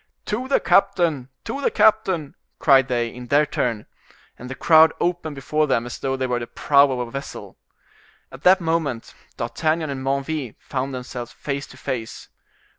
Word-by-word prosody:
"To 240 +5 -3
the 275 - +3
captain, 160 -9 +2
to 280 - -4
the - - +2
captain!" 190 -9 +2 0.2
cried 135 -3 +5
they, 120 -2 0
in 125 0 -9
their 145 +4 +4
turn. 120 -7 -2 0.5
And 125 - -8
the 130 - -5
crowd 160 +3 +6
opened 170 -3 -2
before 150 +3 0
them 120 -4 +1
as 120 - -7
though 135 -1 -2
before 125 -2 -1
the 120 - -6
prow 140 -1 +4
of 125 -2 -2
a - - -15
vessel. 135 +2 -8 0.7
At - - -11
that 185 +1 +6
moment 160 -8 -2 0.2
D'Artagnan 155 +6 -1
and 130 -1 -5
Menneville 140 -1 -2
found 135 0 -4
themselves 125 -1 -6
face 140 0 -5
to - - -15
face. 120 -5 -5
140 Hz, 170 wpm, -22 LUFS, 125-160 Hz, 0.7 s, crowd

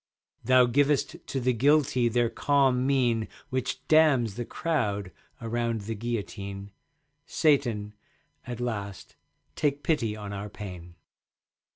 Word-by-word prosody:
Thou 130 -1 +5
givest 140 +3 +1
to 135 - -2
the 125 0 +1
Guilty 130 -1 +3
their 120 +1 +2
calm 135 -1 +2
mien 120 -5 +2 0.2
Which 130 -1 -3
damns 145 -9 +4
the 120 +3 -5
crowd 105 - -2 0.3
around 115 -1 -2
the 110 +3 -4
guillotine. 100 -3 -5 0.6
Satan, 120 -9 +1 0.5
at 120 -1 -5
last 100 -5 -5 0.4
take 145 -1 0
pity 115 -10 0
on 105 -1 -7
our 100 +1 -5
pain. 90 -5 -9
120 Hz, 115 wpm, -27 LUFS, 105-135 Hz, 0.6 s, Thou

